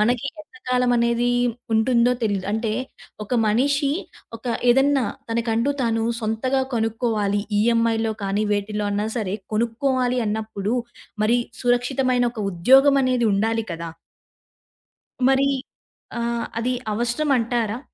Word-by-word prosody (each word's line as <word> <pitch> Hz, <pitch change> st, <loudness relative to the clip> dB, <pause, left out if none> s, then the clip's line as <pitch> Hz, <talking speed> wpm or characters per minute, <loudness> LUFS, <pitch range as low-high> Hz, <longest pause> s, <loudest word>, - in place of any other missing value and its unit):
మనకి 240 Hz, +4 st, +1 dB
ఎంత 310 Hz, +3 st, -17 dB
కాలమనేదీ 245 Hz, -1 st, +2 dB, 0.4 s
ఉంటుందో 235 Hz, +2 st, +3 dB
తెలీదు. 200 Hz, -4 st, 0 dB
అంటే 220 Hz, 0 st, -1 dB, 0.5 s
ఒక 230 Hz, -, -3 dB
మనిషి 275 Hz, +6 st, +2 dB, 0.5 s
ఒక 225 Hz, -, -14 dB, 0.2 s
ఏదన్నా 270 Hz, +1 st, +4 dB, 0.3 s
తనకంటూ 230 Hz, +3 st, 0 dB
తాను 225 Hz, -1 st, 0 dB, 0.2 s
సొంతగా 230 Hz, +5 st, 0 dB
కొనుక్కోవాలి 220 Hz, -3 st, 0 dB, 0.2 s
ఈఎంఐ‌లో 225 Hz, 0 st, +2 dB
కానీ 200 Hz, +2 st, 0 dB
వేటిలో 205 Hz, +1 st, -2 dB
అన్న 205 Hz, +1 st, -1 dB
సరే 205 Hz, -4 st, -2 dB, 0.2 s
కొనుక్కోవాలి 250 Hz, +3 st, 0 dB
అన్నప్పుడు 215 Hz, 0 st, -2 dB, 0.5 s
మరి 230 Hz, +3 st, +3 dB, 0.2 s
సురక్షితమైన 245 Hz, +1 st, +1 dB
ఒక 235 Hz, -, -11 dB
ఉద్యోగమనేది 255 Hz, +5 st, +4 dB
ఉండాలి 225 Hz, +3 st, 0 dB
కదా! 165 Hz, 0 st, -5 dB, 1.4 s
మరి 270 Hz, +1 st, +3 dB, 0.7 s
ఆహ్, 235 Hz, 0 st, -1 dB
అది 245 Hz, +2 st, 0 dB, 0.2 s
అవసరమంటారా? 240 Hz, -2 st, 0 dB
235 Hz, 105 wpm, -22 LUFS, 220-250 Hz, 1.4 s, ఏదన్నా